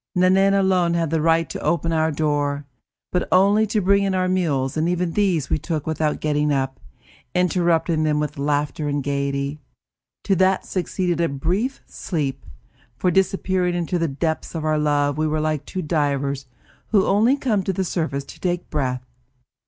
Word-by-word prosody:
Nanine 190 +2 +4
alone 185 -3 +2
had 165 -2 0
the 160 -1 +1
right 165 +1 +3
to - - -6
open 165 -1 0
our 160 0 +2
door, 145 -1 -1 0.5
but 180 - 0
only 200 +4 +4
to 215 +1 0
bring 200 +2 +3
in 195 -1 0
our 185 0 +1
meals 150 -8 0
and 160 +2 +1
even 180 -1 0
these 180 -7 0
we - - +2
took 155 -2 -3
without 155 -1 -1
getting 150 -1 +1
up, 135 -1 -1 0.6
interrupting 170 -2 +2
them 150 -1 +1
with 150 -1 -3
laughter 145 +1 -1
and 145 -1 -1
gaiety. 140 +1 -2 0.6
To 195 - +2
that 190 +1 +2
succeeded 180 -2 -1
a 170 - +2
brief 180 - -2
sleep, 140 - -4 0.5
for, 180 - +1
disappearing 185 -1 +1
into 175 +1 -1
the 165 - +1
depths 160 +4 -3
of 160 -1 -3
our 155 -1 +1
love, 145 -1 +1
we 155 - +1
were 155 0 0
like 155 -2 -1
two 185 - -4
divers 140 -3 -1 0.4
who 200 -3 +3
only 225 +7 +3
come 225 -8 0
to 190 - -1
the 190 +1 -1
surface 150 -6 -2
to - - -13
take 180 -1 -2
breath. 130 -4 -2
165 Hz, 175 wpm, -22 LUFS, 145-185 Hz, 0.6 s, Nanine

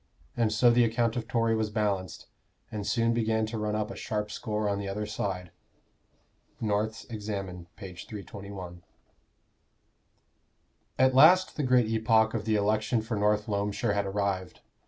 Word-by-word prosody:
And 115 -2 +1
so 120 +3 +5
the 120 +1 +5
account 115 0 +1
of 115 -2 -3
Tory 115 -1 +1
was 110 -1 0
balanced, 100 -5 -2 0.5
and 105 -1 -4
soon 115 +2 +2
began 110 -1 +1
to 110 +1 -5
run 105 0 -1
up 110 +1 -2
a - - -7
sharp 105 -1 -3
score 105 -1 -2
on 100 -1 0
the 100 - -4
other 105 +2 -3
side." 95 -4 -4 1.1
NORTH'S 110 +1 -1
Examen, 100 -6 -5
p. 95 -2 -9
321. 95 -2 -8 2.2
At 130 0 +4
last 175 +8 +6
the - - -1
great 125 -3 +4
epoch 110 0 +3
of 110 -2 -3
the 110 -1 +2
election 110 +2 +1
for 115 0 -3
North 105 0 +2
Loamshire 100 0 -1
had 100 -1 0
arrived. 95 -2 -2
105 Hz, 155 wpm, -28 LUFS, 100-115 Hz, 2.2 s, last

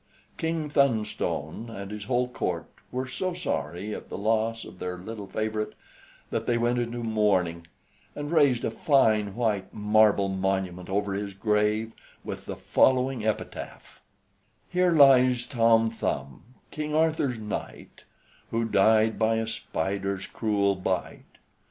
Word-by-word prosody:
King 160 -2 -2
Thunstone 115 - 0
and 100 -2 -7
his 105 -1 -6
whole 125 0 +1
court 90 -8 -3 0.3
were 130 +1 -3
so 180 +7 -3
sorry 100 - -3
at - - -8
the - - -5
loss 110 +2 0
of 90 - -12
their 90 0 -4
little 105 +2 -7
favorite, 110 +1 -2 0.6
that - - -2
they 120 - +2
went 120 +1 +1
into 120 0 -3
mourning, 95 -7 +1 0.5
and 145 +1 -5
raised 140 -7 +3
a - - -1
fine 110 -7 +2
white 105 -5 -1
marble 105 -1 +3
monument 95 -2 -2
over 100 +1 0
his 100 0 -4
grave, 105 +2 +1 0.3
with - - -7
the - - -4
following 130 -2 +2
epitaph: 110 - -5 0.7
"Here 180 0 +3
lies 130 -5 +6
Tom 115 -3 +3
Thumb, 70 -11 -4 0.3
King 150 0 -3
Arthur's 155 -6 +1
knight, 105 -1 -7 0.4
Who 115 0 0
died 110 +1 +3
by 110 0 +3
a 110 0 0
spider's 100 -2 -3
cruel 100 -3 +1
bite. 95 - -4
110 Hz, 135 wpm, -27 LUFS, 100-125 Hz, 0.7 s, lies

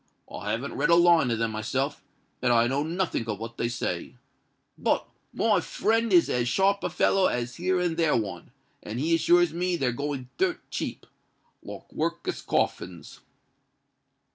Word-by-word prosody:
I - - -5
haven't 125 +5 -2
read 150 +3 0
a 170 - +7
line 170 -5 +5
of 115 - 0
them 115 0 -1
myself; 130 +7 -2 0.4
and 125 - +2
I 115 -1 +5
know 135 +4 0
nothink 165 -6 -2
of 105 -2 -2
what 115 +2 -8
they 115 - 0
say;—but 120 - -4 0.3
my - - +2
friend 225 0 0
is 175 -3 +6
as 120 0 0
sharp 195 +8 +2
a - - 0
feller 195 -1 +3
as 120 0 -3
here 185 +1 +1
and 175 -2 -1
there 165 -3 +3
one; 95 -6 -4 0.3
and 110 +3 -5
he 160 +4 +1
assures 170 +1 +4
me 180 +1 0
they're 135 -7 0
going 140 0 -4
dirt 375 -1 +1
cheap—like - - -9
workus 170 +2 -2
coffins." 90 -2 -2
145 Hz, 160 wpm, -27 LUFS, 120-175 Hz, 0.4 s, a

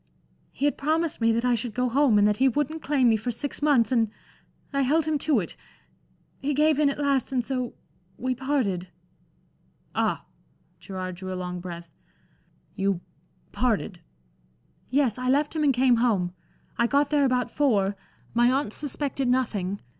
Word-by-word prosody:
He 280 - -2
had 290 - +1
promised 315 0 0
me 230 0 +4
that 230 +2 0
I 250 - +3
should 230 -1 -3
go 250 0 +1
home, 255 -2 +3
and 205 0 +5
that 210 0 +1
he 265 - +4
wouldn't 295 +5 -1
claim 275 -4 +2
me 225 -1 +4
for 220 +4 -4
six 265 +6 -4
months, 280 -5 +3
and 230 -4 +2 0.6
I 275 - +2
held 295 +4 +2
him 310 -2 0
to 285 -4 +2
it. 175 - -5 0.9
He 285 +1 -1
gave 305 0 +3
in 295 -2 +4
at 280 - -3
last, 280 -3 0
and 250 -3 0
so 255 -2 -3 0.4
we 255 +1 -1
parted" 250 -9 -1 1.1
"Ah!" - - 0 0.5
Gerard 185 -2 -6
drew 185 +1 -6
a - - -3
long 180 0 -4
breath. 170 -1 -9 0.8
"You 195 -2 0 0.5
parted?" 215 -6 -1 0.9
"Yes. 255 -4 +1
I 255 0 -1
left 290 +4 +2
him 310 - 0
and 290 - +5
came 250 -1 +3
home. 200 -7 +1 0.5
I 235 - +4
got 285 +3 +2
there 295 -1 +3
about 250 -2 +1
four 205 -9 +2 0.4
my 240 +1 +4
aunts 265 -5 -1
suspected 280 -2 -2
nothing. 210 -7 0
250 Hz, 170 wpm, -26 LUFS, 210-285 Hz, 1.1 s, and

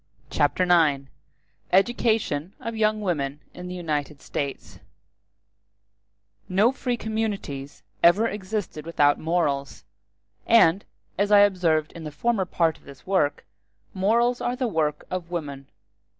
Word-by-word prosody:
Chapter 145 +5 +1
IX: 160 -6 +3 0.7
Education 195 -5 +1
Of 230 0 -5
Young 215 -1 +1
Women 145 -7 -2
In 180 0 -8
The 180 - -6
United 150 -4 -3
States 140 +1 -5 1.7
No 200 +6 +4
free 250 -2 -2
communities 200 - -4 0.2
ever 200 +7 +5
existed 205 -6 -4
without 145 -3 +3
morals; 145 - -1 0.6
and, 200 -5 +5 0.3
as 205 +1 +1
I 205 -1 +8
observed 170 -6 +2
in 165 - -10
the 155 - -6
former 200 +5 0
part 165 -3 0
of - - -27
this 140 -1 -14
work, 185 -7 0 0.5
morals 235 +6 +1
are 245 - -1
the 255 -1 -1
work 155 -7 -1
of 180 -2 -4
woman. 140 -6 -5
180 Hz, 125 wpm, -25 LUFS, 150-215 Hz, 1.7 s, I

